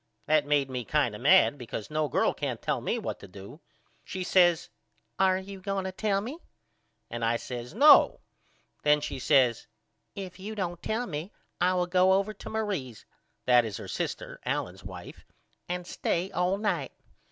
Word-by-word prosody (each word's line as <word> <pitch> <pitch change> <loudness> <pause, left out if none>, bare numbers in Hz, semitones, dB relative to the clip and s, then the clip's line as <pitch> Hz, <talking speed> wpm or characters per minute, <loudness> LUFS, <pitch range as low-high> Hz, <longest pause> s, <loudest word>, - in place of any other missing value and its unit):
That 155 -1 +3
made 145 -2 +2
me 125 -2 -4
kind 140 -2 +1
of 105 - -8
mad 145 +1 +5
because 115 0 -6
no 155 0 0
girl - - +1
can't - - -3
tell - - -1
me - - -1
what - - -4
to - - -11
do. 100 - -11 0.4
She 185 - -5
says 175 -2 +3 0.5
Are 190 -1 +4
you 190 0 -8
going 195 0 -2
to 190 - -3
tell 195 +1 0
me? 260 +10 -6 0.7
and 120 -1 -4
I 115 +1 +2
says 125 +4 -7
No. 290 +4 +7 0.6
Then 150 0 +4
she 145 - -5
says 130 -4 +3 0.5
If 190 -2 -7
you 210 +3 -6
don't 175 -4 -3
tell 230 +3 -1
me 165 +1 -5 0.3
I 180 +1 +3
will 180 -1 +1
go 185 +1 +4
over 200 +2 +1
to 205 - -10
Marie's 195 - -3 0.4
that 125 -1 +6
is 110 -5 -5
her - - -8
sister - - -4
Allen's - - -3
wife - - -10 0.5
and 180 0 -3
stay 180 +1 -2
all 180 +2 +1
night. 210 +1 -1
175 Hz, 175 wpm, -28 LUFS, 135-195 Hz, 0.7 s, No